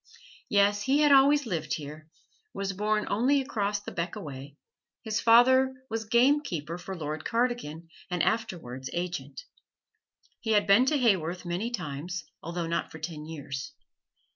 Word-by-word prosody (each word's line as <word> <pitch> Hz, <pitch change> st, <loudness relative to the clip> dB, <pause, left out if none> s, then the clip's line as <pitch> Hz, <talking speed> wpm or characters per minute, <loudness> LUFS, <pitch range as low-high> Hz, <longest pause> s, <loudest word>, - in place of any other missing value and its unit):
Yes, 205 Hz, 0 st, +3 dB
he 275 Hz, +7 st, +2 dB
had 295 Hz, -1 st, +5 dB
always 280 Hz, +1 st, +6 dB
lived 165 Hz, -8 st, -2 dB
here, 155 Hz, +1 st, -9 dB, 0.5 s
was 195 Hz, 0 st, -2 dB
born 210 Hz, +2 st, 0 dB
only 255 Hz, +7 st, +2 dB
across 205 Hz, -6 st, -1 dB
the 205 Hz, -, -8 dB
beck 170 Hz, +5 st, -3 dB
away 145 Hz, -6 st, -8 dB, 0.5 s
his 220 Hz, -2 st, -1 dB
father 260 Hz, +3 st, +5 dB, 0.2 s
was 225 Hz, 0 st, -2 dB
gamekeeper 235 Hz, -, +1 dB
for 190 Hz, +2 st, -6 dB
Lord 155 Hz, -1 st, -4 dB
Cardigan, 230 Hz, -10 st, -1 dB, 0.2 s
and 180 Hz, -2 st, 0 dB
afterwards 165 Hz, -, -2 dB
agent. 170 Hz, -6 st, -4 dB, 1.0 s
He 220 Hz, -1 st, 0 dB
had 205 Hz, -1 st, +4 dB
been 215 Hz, +7 st, +5 dB
to 300 Hz, -, +3 dB
Haworth 185 Hz, -, +1 dB
many 175 Hz, +7 st, -2 dB
times, 175 Hz, -, -5 dB, 0.2 s
although 170 Hz, +1 st, -4 dB
not 165 Hz, +1 st, -2 dB
for -, -, -9 dB
ten 155 Hz, -1 st, -6 dB
years. 140 Hz, -3 st, -6 dB
195 Hz, 145 wpm, -28 LUFS, 160-230 Hz, 1.0 s, always